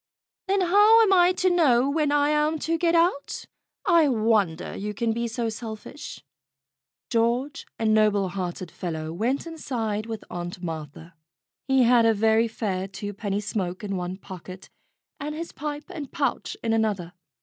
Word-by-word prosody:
"Then 390 0 +2
how 415 +5 +6
am 395 -3 +4
I 355 -1 +6
to 370 0 +2
know 275 -8 +4
where 295 0 +1
I 290 0 +3
am 300 +1 +2
to 320 +2 -1
get 335 0 +2
out? 335 -4 +1 0.4
I 335 -4 +5
wonder 215 - +1
you 210 +1 -4
can 225 +1 0
be 235 +1 -2
so 230 +1 -2
selfish." 220 +4 -7 0.9
George, 240 +5 0
a 225 - -2
noble 215 -3 +3
hearted 180 -2 -5
fellow, 160 -2 -4
went 240 - -1
inside 230 -10 -3
with 225 -2 -5
Aunt 175 +1 -6
Martha. 160 +1 -7 0.5
He 265 -1 +4
had 235 -1 +5
a 225 - +4
very 220 +2 +3
fair 195 -4 -3
twopenny 205 0 -4
smoke 190 -3 -3
in 200 -1 -3
one 180 0 -4
pocket, 185 -1 -10 0.5
and 300 +1 -4
his 330 +2 -5
pipe 295 0 -5
and 290 -5 -7
pouch - - -2
in 225 -1 +1
another. 205 -6 0
225 Hz, 160 wpm, -25 LUFS, 195-295 Hz, 0.9 s, how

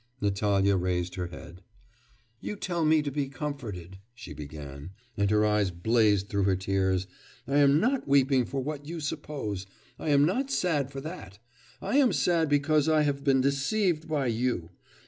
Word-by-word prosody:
Natalya 100 -1 +2
raised 90 -1 -1
her 90 -2 -3
head. 85 0 -11 0.8
'You - - -5
tell 175 -4 -2
me 155 -1 +4
to 145 - -3
be 140 -1 -2
comforted,' 115 - -6 0.2
she - - -9
began, 75 +2 -9 0.2
and 100 -1 +1
her 105 0 +3
eyes 105 -2 +2
blazed 100 +2 +2
through 100 -2 0
her 95 -1 +3
tears; 95 0 0 0.4
'I 140 +2 +1
am 145 0 +5
not 255 - 0
weeping 135 -2 +3
for 135 +2 -3
what 145 0 -5
you 170 +1 -5
suppose 110 -10 -4 0.3
I - - -3
am 145 0 +5
not 255 - 0
sad 160 - 0
for 135 -1 -7
that; 145 - -8 0.5
I 270 - +1
am 270 -4 +4
sad 165 -3 +2
because 145 +1 +2
I 155 -1 +4
have 140 -1 -1
been 135 -2 +3
deceived 155 +4 0
in 140 -5 +1
you.... 115 -8 -2
135 Hz, 170 wpm, -28 LUFS, 95-150 Hz, 0.8 s, am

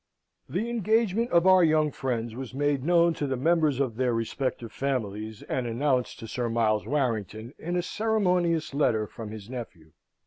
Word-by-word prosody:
The 230 - -1
engagement 225 0 +1
of 170 0 +3
our 185 -1 +7
young 155 -2 +3
friends 120 -4 -3
was 130 +1 -7
made 145 -1 0
known 170 +1 +4
to 145 - -3
the 130 -1 -1
members 155 -1 +2
of 125 -5 -1
their 125 -2 +1
respective 115 0 -3
families, 110 -5 -3
and 125 -2 -2
announced 125 +1 0
to 115 - -7
Sir 120 +2 -2
Miles 110 -2 +1
Warrington, 115 -4 -2
in 175 +2 -3
a 175 - 0
ceremonious 180 -8 +1
letter 115 -7 +2
from 110 +1 -8
his 105 -2 -9
nephew. 110 -11 -8
135 Hz, 170 wpm, -27 LUFS, 115-170 Hz, -, our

